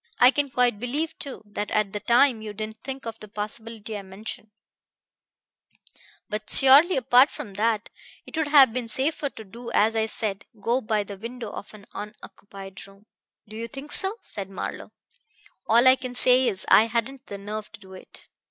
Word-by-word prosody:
"I 250 Hz, +1 st, +7 dB
can 290 Hz, 0 st, -1 dB
quite 245 Hz, -4 st, +1 dB
believe, 285 Hz, +7 st, -3 dB
too, 275 Hz, -6 st, -7 dB
that 205 Hz, 0 st, -5 dB
at 210 Hz, -2 st, 0 dB
the 210 Hz, -, -3 dB
time 240 Hz, +1 st, +3 dB
you 215 Hz, -1 st, -7 dB
didn't 215 Hz, +1 st, -7 dB
think 270 Hz, -1 st, -7 dB
of 225 Hz, -1 st, -7 dB
the 215 Hz, -, -10 dB
possibility 215 Hz, +1 st, -6 dB
I 205 Hz, -, -5 dB
mentioned. 200 Hz, +3 st, -8 dB, 1.8 s
But 215 Hz, -2 st, -5 dB
surely, 285 Hz, +6 st, +7 dB
apart 255 Hz, +2 st, +5 dB
from 200 Hz, -, -9 dB
that, 215 Hz, +1 st, -1 dB, 0.3 s
it -, -, -10 dB
would 320 Hz, -2 st, 0 dB
have 275 Hz, -5 st, +6 dB
been 250 Hz, -2 st, -3 dB
safer 285 Hz, +5 st, -1 dB
to 220 Hz, -, -11 dB
do 235 Hz, +4 st, -10 dB
as 220 Hz, +2 st, +3 dB
I 220 Hz, 0 st, +1 dB
said: 205 Hz, -3 st, -2 dB
go 240 Hz, +5 st, 0 dB
by 215 Hz, -2 st, -1 dB
the 200 Hz, 0 st, -9 dB
window 230 Hz, 0 st, -7 dB
of -, -, -9 dB
an 205 Hz, -1 st, -15 dB
unoccupied 195 Hz, -2 st, -10 dB
room." 195 Hz, +1 st, -20 dB, 0.4 s
"Do 215 Hz, -, -11 dB
you 230 Hz, +1 st, -5 dB
think 275 Hz, +4 st, -9 dB
so?" 390 Hz, +2 st, +2 dB
said 195 Hz, -2 st, -6 dB
Marlowe. 195 Hz, -, -6 dB, 0.8 s
"All 235 Hz, +3 st, +5 dB
I 260 Hz, +1 st, +7 dB
can 255 Hz, -1 st, -7 dB
say 250 Hz, +1 st, +5 dB
is 190 Hz, -1 st, 0 dB
I 220 Hz, -, +6 dB
hadn't 240 Hz, +4 st, -3 dB
the 200 Hz, -, -7 dB
nerve 210 Hz, +2 st, -7 dB
to -, -, -12 dB
do 190 Hz, -1 st, -15 dB
it. 185 Hz, -, -14 dB
225 Hz, 190 wpm, -25 LUFS, 210-255 Hz, 1.8 s, I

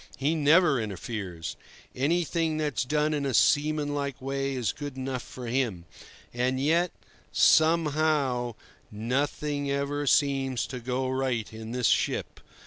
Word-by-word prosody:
He 145 Hz, +4 st, +1 dB
never 155 Hz, -3 st, +4 dB
interferes. 95 Hz, -5 st, -5 dB, 0.4 s
Anything 165 Hz, +2 st, 0 dB
that's 145 Hz, -6 st, -1 dB
done 150 Hz, +3 st, +1 dB
in 145 Hz, -1 st, -1 dB
a 135 Hz, -3 st, 0 dB
seamanlike 145 Hz, -2 st, +1 dB
way 135 Hz, +1 st, -2 dB
is 120 Hz, -5 st, 0 dB
good 145 Hz, -2 st, -7 dB
enough 130 Hz, -1 st, -3 dB
for 125 Hz, +1 st, -9 dB
him. 115 Hz, -8 st, -1 dB, 0.5 s
And 125 Hz, +2 st, 0 dB
yet, 165 Hz, +5 st, +2 dB, 0.4 s
somehow, 155 Hz, -6 st, +3 dB, 0.4 s
nothing 140 Hz, +6 st, -2 dB
ever 140 Hz, +1 st, -1 dB
seems 135 Hz, -3 st, +2 dB
to 125 Hz, -, -6 dB
go 125 Hz, +2 st, -2 dB
right 130 Hz, -4 st, -1 dB
in 110 Hz, 0 st, -7 dB
this 125 Hz, 0 st, -1 dB
ship. -, -, +1 dB
135 Hz, 130 wpm, -27 LUFS, 125-150 Hz, 0.5 s, never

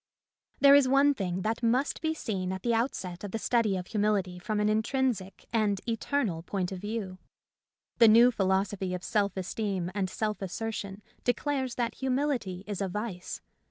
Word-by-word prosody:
There 280 Hz, 0 st, +8 dB
is 285 Hz, -2 st, +6 dB
one 275 Hz, +2 st, +5 dB
thing 185 Hz, -6 st, -3 dB
that 225 Hz, +2 st, -1 dB
must 250 Hz, +4 st, +1 dB
be 320 Hz, 0 st, 0 dB
seen 190 Hz, -9 st, -3 dB
at 190 Hz, 0 st, -5 dB
the 235 Hz, -, +1 dB
outset 205 Hz, -7 st, -2 dB
of 205 Hz, -, -4 dB
the, 225 Hz, -, -3 dB
study 225 Hz, -3 st, +1 dB
of 180 Hz, -, -5 dB
humility 200 Hz, -3 st, 0 dB
from 210 Hz, +3 st, -2 dB
an 210 Hz, -, +2 dB
intrinsic 220 Hz, -3 st, -1 dB
and 210 Hz, -3 st, +2 dB
eternal 225 Hz, -, -1 dB
point 180 Hz, +1 st, -3 dB
of 190 Hz, -, -5 dB
view. 205 Hz, -2 st, -4 dB, 0.8 s
The 230 Hz, -, +8 dB
new 235 Hz, +3 st, +7 dB
philosophy 190 Hz, -2 st, 0 dB
of 180 Hz, -, -7 dB
self 200 Hz, -2 st, 0 dB
esteem 190 Hz, -1 st, -2 dB
and 195 Hz, -2 st, -1 dB
self 215 Hz, +2 st, -2 dB
assertion 200 Hz, +1 st, -4 dB, 0.2 s
declares 260 Hz, 0 st, -1 dB
that 235 Hz, -2 st, -1 dB
humility 260 Hz, -8 st, -1 dB
is 205 Hz, -2 st, -4 dB
a 195 Hz, -, 0 dB
vice. 190 Hz, -2 st, -5 dB
210 Hz, 170 wpm, -29 LUFS, 190-235 Hz, 0.8 s, There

